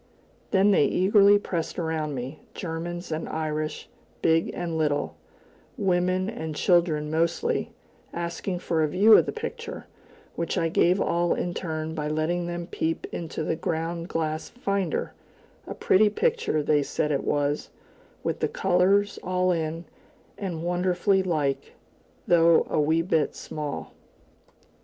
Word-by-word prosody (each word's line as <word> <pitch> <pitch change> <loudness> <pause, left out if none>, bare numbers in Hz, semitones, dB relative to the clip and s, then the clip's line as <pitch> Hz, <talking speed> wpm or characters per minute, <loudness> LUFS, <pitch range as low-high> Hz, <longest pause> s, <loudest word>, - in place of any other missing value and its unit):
Then 195 +1 +4
they 150 - +5
eagerly 200 +2 +5
pressed 170 -5 -3
around 160 -4 -2
me, 130 +4 -6 0.2
Germans 175 0 -5
and 155 +1 -3
Irish, 155 -1 -3 0.4
big 165 0 +3
and 170 -2 -4
little, 150 -2 0 0.6
women 185 -2 +1
and 160 -7 -5
children 160 -3 +2
mostly, 170 - 0 0.4
asking 170 +2 -3
for 165 -3 0
a 155 - +3
view 200 +8 +6
of - - +5
the - - -1
picture, 460 0 -6 0.5
which 170 - -2
I 165 - +1
gave 180 +3 +3
all 175 -2 +1
in 175 - -2
turn 160 -2 -4
by 150 -2 -3
letting 160 +3 -1
them 175 0 -4
peep 165 -1 -2
into 160 -1 -4
the 160 - -1
ground 165 +1 -3
glass 155 -2 -2
"finder" 200 -7 -2 0.5
a - - -5
pretty 210 +3 +4
picture, 455 - 0
they 150 0 +3
said 150 +1 -1
it 140 - 0
was, 145 0 0 0.5
with - - -2
the - - +1
colors 195 +3 +2
all 185 0 +1
in, 165 0 -2 0.5
and 175 -5 -4
"wonderfully 180 +2 +2
like," 155 -7 -1 0.5
though 170 -1 +5
a 155 - +2
wee 160 +2 +2
bit 160 -3 +1
small. 145 - -6
170 Hz, 140 wpm, -26 LUFS, 155-185 Hz, 0.6 s, view